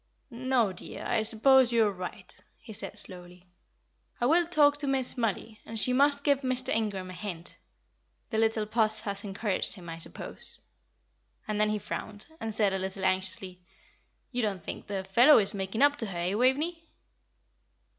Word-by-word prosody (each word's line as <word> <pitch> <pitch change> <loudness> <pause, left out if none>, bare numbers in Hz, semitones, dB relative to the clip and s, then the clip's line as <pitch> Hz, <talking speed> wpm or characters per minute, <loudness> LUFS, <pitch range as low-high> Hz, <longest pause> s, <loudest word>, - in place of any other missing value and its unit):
"No, 240 -4 +1
dear; 180 - -8
I 235 -2 +1
suppose 245 +3 +4
you 230 -2 +4
are 205 - +1
right," 180 -2 -8 0.2
he 220 - -11
said, 210 0 -5
slowly. 180 -2 -6 0.7
"I 240 - +1
will 335 +5 +4
talk 290 -4 +4
to 290 -1 -1
Miss 265 -2 +1
Mollie, 225 -2 -2
and 225 0 -5
she 250 - +3
must 285 +2 +3
give 280 -2 +2
Mr. 255 -1 +1
Ingram 200 -4 -1
a - - -9
hint. 180 -3 -6 0.8
The 220 - 0
little 220 -1 +2
Puss 215 0 +1
has 200 -1 -3
encouraged 200 0 -2
him, 175 -4 -11
I 165 0 -7
suppose." - - -8 0.9
And 210 -1 -1
then 215 - +3
he 215 - 0
frowned, 210 0 -6
and 225 - -4
said, 210 -2 +1
a 190 - -1
little 190 +1 -3
anxiously, 185 -1 -1 0.7
"You 245 -1 -1
don't 200 -6 -2
think - - -7
the 195 -2 -3
fellow 240 +10 +6
is 200 -3 +2
making 195 +5 -1
up 290 0 +4
to 225 - -1
her, 185 -3 -6
eh, 175 +2 -1
Waveney?" 290 +9 +1
215 Hz, 175 wpm, -29 LUFS, 190-255 Hz, 0.9 s, fellow